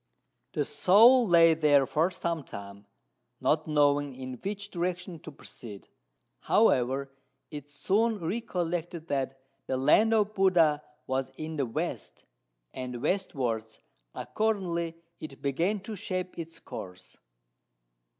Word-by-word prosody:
The - - 0
soul 230 +6 +6
lay 165 -2 +6
there 150 -3 +4
for 160 +7 +1
some 170 -4 -3
time, 100 -2 -10 0.5
not 150 +5 +1
knowing 145 -2 +2
in 130 -1 -7
which 205 +1 -4
direction 180 -1 -3
to 155 - -10
proceed; 110 -7 -11 0.5
however, 135 +2 +2 0.4
it 145 -1 -8
soon 215 +10 +1
recollected 175 -4 -3
that 135 -1 -2 0.3
the 130 - -1
land 215 +12 +4
of 210 -1 +1
Buddha 175 -7 +3 0.2
was 130 0 -1
in 160 0 -5
the 135 -3 0
west, 115 - -4 0.5
and 125 -1 -5
westwards 120 - -2 0.4
accordingly 180 -6 -1 0.2
it 145 -4 -9
began 170 +10 0
to 215 +2 -6
shape 185 -3 -4
its 165 0 -8
course. 90 0 -10
160 Hz, 120 wpm, -29 LUFS, 135-185 Hz, 0.5 s, soul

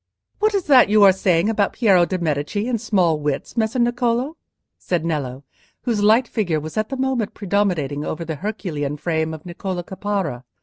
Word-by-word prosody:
"What 425 0 +2
is 390 - +1
that 260 -8 +6
you 210 0 +5
are 195 - +8
saying 185 -1 +1
about 210 -3 +1
Piero 190 -7 +4
de' 185 - -2
Medici 165 +6 -2
and 235 -4 -1
small 180 -8 +2
wits, 145 - -3
Messer 225 +1 0
Niccolò?" 240 +3 +1 0.5
said 170 -3 -2
Nello, 140 -5 -3 0.4
whose 230 -5 0
light 220 +4 +4
figure 175 -10 -1
was 155 +1 -8
at 215 0 -1
that 270 - -4
moment 260 -5 -1
predominating 180 -8 -1
over 165 +2 -4
the 160 -2 -4
Herculean 150 -7 -4
frame 160 0 -1
of 155 -1 -8
Niccolò 175 0 -5
Caparra. 190 -9 -3
190 Hz, 180 wpm, -21 LUFS, 160-220 Hz, 0.5 s, are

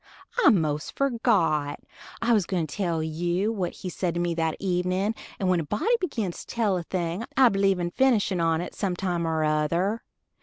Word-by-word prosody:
I - - +8
most 155 - 0
forgot, 200 - +1 0.4
I 235 +1 +3
was 205 -6 +2
gwine 175 -4 0
to 150 - -9
tell 170 -6 -1
you 175 +6 -1
what 190 -6 -2
he 185 - -6
said 175 -1 -2
to - - -1
me 175 -1 0
that 160 -1 -1
evenin', 185 +2 0 0.2
and 190 - -1
when 180 -1 +3
a - - -1
body 320 - +1
begins 225 - -3
to - - -23
tell 215 -5 +2
a - - -2
thing 170 +3 -3
I 260 -2 +7
believe 195 -2 +2
in 175 0 -2
finishin' 210 -7 +2
on't 165 +1 0
some 190 -3 -2
time 175 -3 -1
or 160 -1 0
other. 170 +8 +1
180 Hz, 195 wpm, -26 LUFS, 165-205 Hz, 0.4 s, I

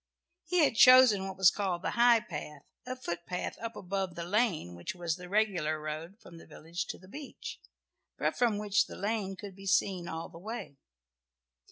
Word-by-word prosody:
He 360 -3 +3
had 285 - +3
chosen 240 -4 +7
what 190 0 -7
was 190 -2 +6
called 185 -3 -2
the - - -1
high 235 -1 +5
path, 150 -10 -7 0.2
a 255 - -3
footpath 180 -6 -4
up 230 -1 -5
above 190 -2 -3
the 170 - -4
lane, 180 - 0
which 85 - -6
was 170 -3 -2
the 180 0 -10
regular 185 -7 +1
road 155 +5 -6
from 170 - -13
the - - -15
village 165 +3 -6
to - - -5
the 185 - -17
beach, 280 +7 -8 0.6
but - - 0
from 235 -4 +2
which 210 0 +2
the - - -9
lane 200 -2 -2
could 195 -1 -9
be 195 0 -10
seen 190 -2 +1
all 165 +1 -5
the 165 - -13
way. 210 -8 -7
190 Hz, 190 wpm, -31 LUFS, 170-220 Hz, 0.6 s, chosen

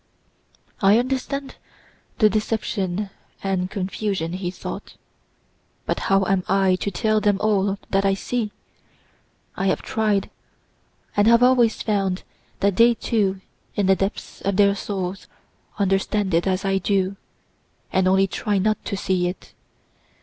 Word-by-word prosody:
"I 200 +2 +6
understand 265 +2 -2 0.6
the 215 - +6
deception 210 -2 -1 0.3
and 190 -2 -1
confusion," 190 -3 -2
he 180 -1 -3
thought, 180 - -7 0.9
"but - - -1
how 195 0 +4
am 190 -1 +1
I 195 -1 +3
to 200 - -2
tell 215 +2 +1
them 205 -2 +2
all 200 -2 +1
that 195 0 +2
I 195 0 +3
see? 220 +1 -2 1.0
I 195 - -1
have - - 0
tried, 215 -3 0 0.8
and 205 +1 +4
have 235 +1 +6
always 245 -3 +4
found 195 -3 0 0.4
that 200 -1 +2
they 235 +1 +6
too 200 -5 0 0.3
in 205 - +1
the 190 0 +5
depths 195 +2 -4
of 200 -1 -1
their 200 -1 +5
souls 195 -1 -4 0.5
understand 195 0 0
it 170 +3 +2
as 190 +1 0
I 195 0 +2
do, 195 -1 0 0.8
and 190 0 +3
only 190 +1 +4
try 205 +2 -1
not 215 +3 +1
to 200 - -3
see 185 -2 0
it. 180 - -7
195 Hz, 140 wpm, -23 LUFS, 190-215 Hz, 1.0 s, I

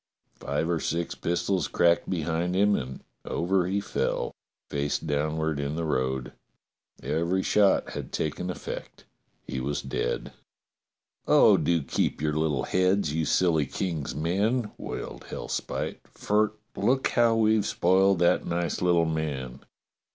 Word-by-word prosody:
Five 70 +4 -1
or 85 -1 0
six 85 +2 -2
pistols 85 0 -1
cracked 85 0 +2
behind 85 0 -1
him 100 +1 +4
and 65 -1 -5 0.2
over 90 +1 0
he 100 +2 0
fell, 100 - -2 0.3
face 70 0 -1
downward 80 0 -1
in 70 +1 -2
the 85 0 -2
road. 65 -3 -1 0.7
Every 85 +6 0
shot 100 -2 +3
had - - -6
taken 80 +4 -2
effect: 90 - -7 0.4
he 65 - -4
was 70 +3 -2
dead. 65 - -3 0.5
*' - - -63
Oh, - - +7
do 85 -3 +1
keep - - -1
your 75 0 0
little 75 -4 0
heads, 95 -2 +1
you 80 0 0
silly 80 -2 +2
King's 80 -9 -3
men! 105 - 0
'* - - -32
wailed - - -6
Hellspite, - - -4
*'for 105 +1 +1 0.2
look 130 +2 +2
how 115 -1 +3
we've 110 -1 +3
spoiled 95 +2 +3
that 85 0 +3
nice 85 -2 -2
little 85 -2 +3
man. 70 -5 -3
85 Hz, 140 wpm, -27 LUFS, 75-95 Hz, 0.7 s, Oh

